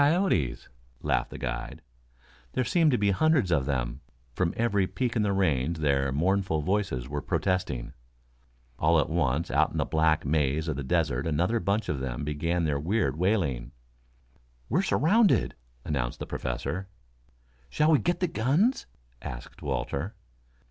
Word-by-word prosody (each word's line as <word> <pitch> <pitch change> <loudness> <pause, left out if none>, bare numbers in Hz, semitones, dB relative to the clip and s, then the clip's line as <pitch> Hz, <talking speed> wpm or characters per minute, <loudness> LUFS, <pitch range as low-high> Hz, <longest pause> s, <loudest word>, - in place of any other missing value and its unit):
"Coyotes," 145 - +2 0.4
laughed - - 0
the - - -8
guide. - - -5 0.7
There 130 - +1
seemed 165 +4 +3
to 125 - +3
be 100 -2 +2
hundreds 135 - +2
of 70 -5 +2
them. 60 -1 -2 0.3
From 90 -2 0
every 105 -5 +2
peak 125 +2 -2
in 110 - +2
the 105 -1 +1
range 85 -5 +1
their 70 -3 +1
mournful 85 +1 +1
voices 90 -10 -1
were 75 +1 -3
protesting. 90 -10 -1 0.9
All 80 +1 +4
at 75 - 0
once 80 -2 0
out - - +3
in - - -5
the - - +1
black 80 -1 +2
maze 75 +1 +1
of 80 - -1
the 70 - -4
desert 75 -3 0
another 90 +9 +1
bunch 100 +3 0
of 70 - -1
them 65 0 -4
began 85 +4 -1
their 75 -3 0
weird 85 -3 0
wailing. 80 - 0 1.0
"We're - - +2
surrounded," 195 - +3 0.3
announced 65 -5 -2
the - - -5
Professor. 65 +10 -4 0.8
"Shall 150 - +2
we 150 - +5
get 175 +1 -1
the 180 - +2
guns?" 165 - +1 0.3
asked - - -8
Walter. 90 +11 -3
85 Hz, 155 wpm, -28 LUFS, 70-105 Hz, 1.0 s, we